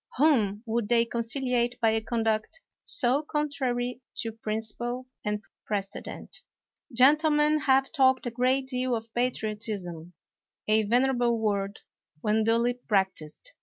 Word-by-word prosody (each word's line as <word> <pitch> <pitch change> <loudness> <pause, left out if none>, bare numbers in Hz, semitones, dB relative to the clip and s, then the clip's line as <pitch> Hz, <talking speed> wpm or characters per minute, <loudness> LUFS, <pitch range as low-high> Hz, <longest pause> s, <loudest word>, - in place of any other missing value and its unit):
Whom 225 -8 +3
would 225 -2 -1
they 235 -1 +4
conciliate 240 +1 -1
by 225 -1 +3
a 220 0 0
conduct 225 +5 -1 0.2
so 260 +2 +2
contrary 260 -5 -2
to 225 - -2
principle 225 +3 -4 0.2
and 210 0 -2 0.2
precedent? 200 -1 -5 0.5
Gentlemen 300 +4 +4
have 270 -1 +3
talked 260 -4 +3
a 240 - -2
great 255 +3 +1
deal 255 -1 -1
of 225 0 -7
patriot 225 -3 -2
ism. 175 -4 -6 0.5
A 215 +1 +4
venerable 245 +1 +2
word, 205 -2 -1 0.4
when 215 +5 +1
duly 230 +2 +2
practised. 195 - -2
235 Hz, 125 wpm, -27 LUFS, 215-260 Hz, 0.5 s, they